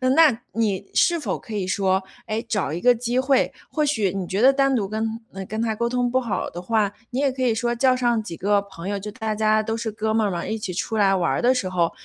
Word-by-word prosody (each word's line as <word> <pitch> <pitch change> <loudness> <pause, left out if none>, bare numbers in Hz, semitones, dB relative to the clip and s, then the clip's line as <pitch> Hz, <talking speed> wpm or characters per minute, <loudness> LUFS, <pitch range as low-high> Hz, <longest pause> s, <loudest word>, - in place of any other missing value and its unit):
那 325 -1 +8 0.2
你 205 -4 0
是 340 -1 +3
否 - - -2
可 225 - -10
以 200 -3 -1
说， 190 0 +1 0.3
哎， 215 +1 -1
找 205 -9 -1
一 165 - -3
个 245 +5 +5
机 240 +2 -1
会。 265 0 +2 0.2
或 305 - 0
许 220 -10 +1
你 190 -2 -3
觉 190 - -2
得 265 +3 +7
单 275 0 +2
独 205 -5 0
跟 220 +2 -3 0.3
跟 215 +1 -3
他 225 -1 0
沟 235 +2 -1
通 245 0 0
不 260 - +3
好 230 -5 -2
的 175 - -7
话， 210 0 +1 0.2
你 250 - -3
也 280 -2 +2
可 260 - -6
以 245 -3 +3
说 240 +1 0
叫 255 +1 +3
上 240 -3 +1
几 170 -6 -7
个 205 +1 +2
朋 190 -2 -9
友， 205 0 -1
就 210 +2 -6
大 220 -1 -3
家 215 0 +2
都 225 +1 -2
是 225 -1 -3
哥 215 +1 -2
们 220 -1 +2
儿 - - -1
嘛， 170 -1 -3
一 220 - -2
起 200 -3 -4
出 220 +5 -2
来 195 -2 +4
玩 175 -3 +1
儿 135 - 0
的 250 +2 +4
时 240 -7 -1
候， 175 -2 +1
220 Hz, 290 characters per minute, -23 LUFS, 200-245 Hz, 0.3 s, 那